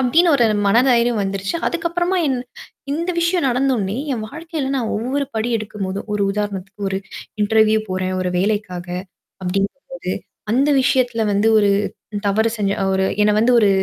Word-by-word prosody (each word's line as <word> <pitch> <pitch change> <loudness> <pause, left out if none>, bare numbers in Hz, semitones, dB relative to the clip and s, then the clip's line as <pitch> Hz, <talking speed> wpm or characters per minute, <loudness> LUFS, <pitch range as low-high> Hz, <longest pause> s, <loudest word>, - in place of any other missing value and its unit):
அப்படின்னு 320 +8 +4
ஒரு 240 - +3 0.2
மன 200 +3 +4
தைரியம் 235 -2 +3
வந்துருச்சு. 195 - -2
அதுக்கப்புறமா 345 +2 0
என் 260 -2 0 0.5
இந்த 335 +4 -1
விஷயம் 340 -3 +1
நடந்தோன்னே, 245 -5 0 0.2
என் 220 -3 -3
வாழ்க்கையில 315 -2 -4
நான் 230 -4 -1
ஒவ்வொரு 265 +6 -1
படி 220 +2 -1
எடுக்கும்போதும். 205 -2 -5
ஒரு 205 - 0
உதாரணத்துக்கு 200 -1 -4
ஒரு 190 0 -1 0.4
இன்டர்வியூ 220 +1 +4
போறேன். 185 0 -1
ஒரு 180 -1 -1
வேலைக்காக. 185 -3 -1 0.5
அப்டிங்கும்போது 195 +3 -3 0.4
அந்த 275 +6 +3
விஷயத்தல 245 -4 +2
வந்து 205 +3 +3
ஒரு 205 -1 +3 0.6
தவறு 220 +3 +2
செஞ்ச 200 -2 0 0.2
ஒரு 190 0 +2 0.2
என்ன 210 - +4
வந்து 240 +3 +4
ஒரு 210 -3 +5
220 Hz, 150 wpm, -20 LUFS, 200-265 Hz, 0.6 s, ஒரு